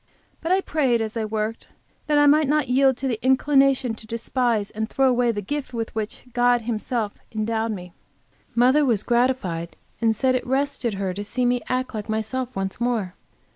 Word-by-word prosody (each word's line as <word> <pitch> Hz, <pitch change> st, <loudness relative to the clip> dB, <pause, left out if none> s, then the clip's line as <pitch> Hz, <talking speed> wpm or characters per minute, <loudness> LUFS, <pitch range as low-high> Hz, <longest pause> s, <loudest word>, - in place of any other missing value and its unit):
But 330 Hz, -, -2 dB
I 380 Hz, +1 st, +4 dB
prayed, 270 Hz, -9 st, +1 dB
as 220 Hz, 0 st, -3 dB
I 225 Hz, -1 st, -1 dB
worked, 215 Hz, +1 st, -3 dB, 0.4 s
that 300 Hz, -1 st, +3 dB
I 290 Hz, -, +6 dB
might 300 Hz, +1 st, +5 dB
not 300 Hz, 0 st, +2 dB
yield 265 Hz, 0 st, +4 dB
to 270 Hz, -, -3 dB
the 235 Hz, -4 st, -3 dB
inclination 265 Hz, -1 st, +3 dB
to 220 Hz, 0 st, -10 dB
despise 230 Hz, -2 st, -1 dB
and 220 Hz, +1 st, -3 dB
throw 270 Hz, -1 st, +2 dB
away 245 Hz, -1 st, +3 dB
the 205 Hz, -2 st, -4 dB
gift 275 Hz, +3 st, -4 dB
with 225 Hz, -1 st, -3 dB
which 220 Hz, -1 st, -4 dB
God 245 Hz, -1 st, +3 dB
has -, -, -14 dB
Himself 225 Hz, -1 st, -2 dB
endowed 220 Hz, +1 st, -1 dB
me. 180 Hz, -3 st, -8 dB, 0.6 s
Mother 255 Hz, +5 st, +5 dB
was 230 Hz, -7 st, +1 dB
gratified, 235 Hz, -9 st, 0 dB, 0.3 s
and 225 Hz, -1 st, +3 dB
said 260 Hz, +4 st, +2 dB
it 255 Hz, -, -2 dB
rested 265 Hz, -4 st, 0 dB
her 190 Hz, -1 st, -2 dB
to 205 Hz, +2 st, -5 dB
see 245 Hz, +4 st, -1 dB
me 245 Hz, 0 st, +2 dB
act 255 Hz, 0 st, -1 dB
like 215 Hz, -1 st, -5 dB
myself 225 Hz, +4 st, -2 dB
once 195 Hz, +3 st, -3 dB
more. 230 Hz, -7 st, 0 dB
240 Hz, 195 wpm, -23 LUFS, 220-260 Hz, 0.6 s, I